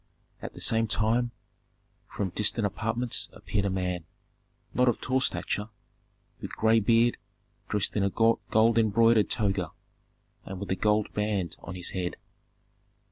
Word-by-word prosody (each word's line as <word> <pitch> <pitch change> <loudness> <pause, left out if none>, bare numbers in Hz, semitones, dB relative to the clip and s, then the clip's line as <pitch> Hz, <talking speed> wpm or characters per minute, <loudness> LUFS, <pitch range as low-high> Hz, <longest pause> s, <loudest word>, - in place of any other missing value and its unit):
At - - -7
the - - -7
same 115 0 +3
time 115 +3 +1 0.8
from 100 -2 -3
distant 105 +2 +2
apartments 115 +4 0
appeared 100 -1 -2
a - - +1
man, 90 -3 -2 0.7
not 125 0 +3
of 120 - -1
tall 130 +1 0
stature, 105 -4 -2 0.7
with - - -6
gray 110 +1 +4
beard, 115 +3 +3 0.5
dressed 105 -2 0
in 105 - +1
a 100 - +2
gold 115 +1 +2
embroidered 115 0 +4
toga, 100 -4 0 0.7
and 95 -1 -7
with 100 - -5
a - - +2
gold 105 +2 +1
band 105 -5 -1
on 95 - -8
his 90 0 -3
head. 90 -2 -3
105 Hz, 140 wpm, -28 LUFS, 100-115 Hz, 0.8 s, gray